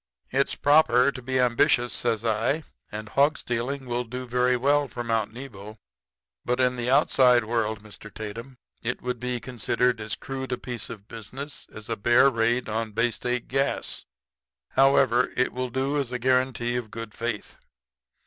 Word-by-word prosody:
"'It's 140 +1 +1
proper 140 -3 +5
to 130 - -8
be 130 +1 -1
ambitious,' 120 0 +3
says 115 -2 -1
I; 115 +8 +1 0.3
'and 110 +1 -6
hog 145 +5 +3
stealing 125 +3 -3
will 120 0 -1
do 125 +2 -6
very 125 +1 +2
well 145 +3 +2
for 120 -1 -5
Mount 115 -2 0
Nebo; 110 -4 -9 0.7
but 125 +1 0
in 125 -1 +3
the 120 0 -2
outside 125 -2 +5
world, 110 -2 -1
Mr. 110 0 -12
Tatum, 115 +6 -7 0.2
it 125 +2 -3
would 125 -1 -2
be 125 0 -2
considered 125 0 0
as 110 +3 -3
crude 130 -1 -6
a 125 - 0
piece 120 -5 -5
of 105 -2 -9
business 130 +7 -8
as 110 -1 -10
a 115 - -1
bear 120 +6 +5
raid 120 +1 +1
on 110 0 -2
Bay 115 +2 +2
State 125 +2 -3
Gas. 135 +1 -1 0.6
However, 130 -2 +4
it 125 - +1
will 125 0 -2
do 135 +4 0
as 135 -3 -2
a 125 - -1
guarantee 125 -1 +1
of 120 -3 -4
good 115 -1 -7
faith. 115 -2 -4
125 Hz, 170 wpm, -26 LUFS, 115-130 Hz, 0.7 s, proper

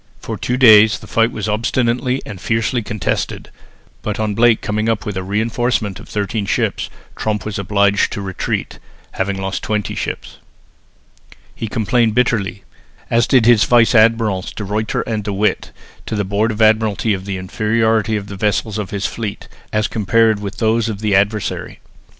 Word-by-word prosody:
For - - -5
two 125 - -2
days 110 -4 +7
the - - -13
fight 115 +1 +1
was 105 -1 -4
obstinately 120 +4 0
and 100 -4 -8
fiercely 115 +2 0
contested, 105 -4 -3 0.5
but 105 -1 -3
on 110 -1 0
Blake 115 +1 +4
coming 110 +2 -1
up 110 -2 -1
with 105 - -4
a 95 - -2
reinforcement 110 +1 -1
of - - -13
thirteen 105 0 -2
fresh - - +1
ships, - - -1 0.3
Tromp 105 -3 -2
was 105 -2 -4
obliged 100 +1 +2
to 100 - -4
retreat, 95 -1 -3 0.3
having 95 0 -2
lost 95 0 -3
twenty 105 -1 -2
ships. - - -5 1.2
He 115 - -5
complained 115 0 +1
bitterly, 110 -5 0 0.5
as 115 0 +3
did 125 -4 +4
his 120 -3 +5
vice 120 -1 +4
admirals 110 -4 +3
De 105 - -6
Ruyter 105 +2 -1
and 110 -2 -3
De 105 - -3
With, 105 +2 0 0.4
to - - -2
the 100 -1 -1
Board 105 +3 0
of 110 +1 0
Admiralty 110 0 +2
of 95 -1 -4
the 100 -1 -3
inferiority 110 +3 0
of 105 -2 -3
the 100 -1 -8
vessels 105 +2 -1
of 105 - -4
his 100 -1 -3
fleet, 110 -3 -4 0.2
as 110 0 +1
compared 110 +1 +2
with 100 +1 -6
those 115 0 +1
of 105 -2 -5
the 105 -2 0
adversary. 105 +2 -1
110 Hz, 175 wpm, -18 LUFS, 100-115 Hz, 1.2 s, days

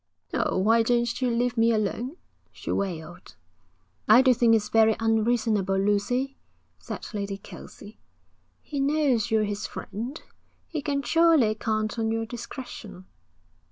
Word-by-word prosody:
'Oh, - - 0
why 225 +5 +4
don't 240 +1 0
you 255 - +2
leave 240 +1 0
me 230 +1 +4
alone?' 230 - -2 0.3
she - - -6
wailed. 175 -3 -4 0.7
'I 220 +4 +8
do 260 -1 +5
think 230 -1 +4
it's 210 -1 0
very 220 -1 +4
unreasonable, 225 -3 +1
Lucy,' 210 +7 0 0.4
said - - -7
Lady 200 -1 -3
Kelsey. 205 +1 -12 0.6
'He 285 - -5
knows 275 -6 +1
you're 220 -1 +2
his 205 0 -3
friend. 235 +9 -6 0.5
He 315 -3 -4
can 280 -1 -1
surely 325 -10 +4
count 215 +1 -2
on 220 0 0
your 225 0 -1
discretion.' 220 -5 -8
225 Hz, 135 wpm, -26 LUFS, 210-245 Hz, 0.7 s, I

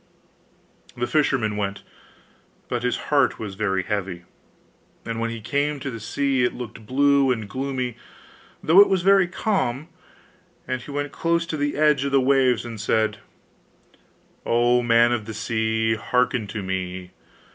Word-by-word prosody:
The 120 - 0
fisherman 120 -7 +1
went, 100 -1 -3 0.8
but 120 - -2
his 125 0 0 0.2
heart 140 -3 +3
was 105 -3 -6
very 95 -2 -1
heavy: 95 -3 -3 0.8
and 115 0 -4
when 115 0 -1
he 115 0 -5
came 145 +6 -1
to 135 0 -5
the 115 - -7
sea, 135 +3 0
it 120 - 0
looked 115 -3 -9
blue 140 +1 +3
and 110 -4 -2
gloomy, 130 0 -3 0.7
though 165 +5 +6
it 205 - +5
was 190 -2 +1
very 195 -1 +5
calm; 175 - -2 0.8
and 130 -1 -2
he 130 - -12
went 145 0 -3
close 170 +2 0
to 165 - -4
the 145 -1 -1
edge 150 -2 +3
of 140 - -2
the 135 - +4
waves, 130 -2 +2
and 115 -3 -7
said: 110 -1 0 1.2
'O 120 +1 +3
man 120 0 +4
of 115 -3 -1
the 110 0 -7
sea! 110 +1 0
Hearken 120 +1 0
to 105 0 -5
me! 95 -1 -4
120 Hz, 155 wpm, -23 LUFS, 110-140 Hz, 1.2 s, though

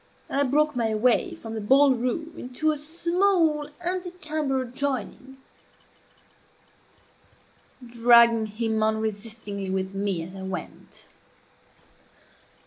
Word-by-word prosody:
and 280 - 0
I - - +4
broke 300 +2 +1
my 225 -3 0
way 250 - +2
from 225 -9 -9
the 220 - -4
ball 270 +5 +5
room 255 +7 -3
into 255 +5 -1
a 300 - -3
small 335 -1 +1 0.2
ante 360 0 -2
chamber 305 -6 -2
adjoining, 265 0 -4 2.5
dragging 235 -1 +5
him 220 +1 -2
unresistingly 215 -2 -3
with 190 0 -2
me 195 -4 -2
as 180 +3 -10
I 190 - -8
went. 190 -3 -8
245 Hz, 110 wpm, -25 LUFS, 220-300 Hz, 2.5 s, ball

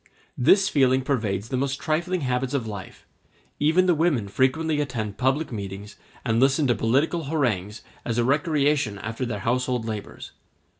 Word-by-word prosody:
This 190 +10 +5
feeling 130 -4 +3
pervades 110 -6 -1
the 130 - -1
most 140 +1 -1
trifling 170 +3 -1
habits 125 0 -1
of 130 -5 -1
life; 100 -4 -8 0.5
even 160 +5 +3
the 180 - +4
women 150 -10 +1
frequently 150 +7 +1
attend 110 -7 -4
public 135 +4 +1
meetings 100 -1 -6 0.3
and 115 -1 +1
listen 135 +3 +3
to 125 - +3
political 140 +9 +1
harangues 110 - -1 0.2
as 115 -1 -2
a 120 - +3
recreation 145 -5 +1
after 110 +5 -4
their 105 -4 -4
household 125 +1 0
labors. 110 -3 -6
130 Hz, 155 wpm, -24 LUFS, 110-150 Hz, 0.5 s, This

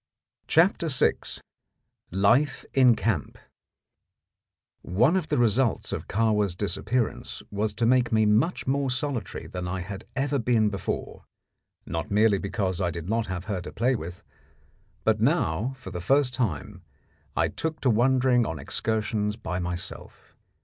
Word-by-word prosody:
CHAPTER 170 0 +3
VI 130 -5 +4 1.0
LIFE 105 - +2
IN 125 -3 +6
CAMP 105 -11 -1 1.4
One 120 - +2
of 180 -4 0
the - - 0
results 120 - +2
of - - -4
Kahwa's 105 -4 +1
disappearance 110 +5 -2
was 105 +1 -1
to 115 - 0
make 125 0 +3
me 110 -1 +3
much 110 +12 +2
more 135 0 0
solitary 130 - -3
than 90 -1 -5
I 90 +1 -3
had 95 +2 -7
ever 140 +1 0
been 115 -3 +2
before, 100 - -4 0.6
not 80 0 -4
merely 105 -1 +3
because 95 -2 -2
I 90 - +1
did 85 +1 -6
not 115 0 0
have 95 -1 -4
her 100 -4 -3
to - - -8
play 125 +3 +1
with, 90 -4 -7 0.8
but - - +2
now, 105 +12 +1
for 130 - -9
the 90 - -5
first 135 +4 +2
time, 105 - -2 0.6
I - - +3
took 160 -1 -3
to 130 - +3
wandering 125 +1 +3
on 80 -7 -3
excursions 105 +6 -1
by 90 -5 -4
myself. 90 +1 -6
110 Hz, 145 wpm, -26 LUFS, 95-130 Hz, 1.4 s, IN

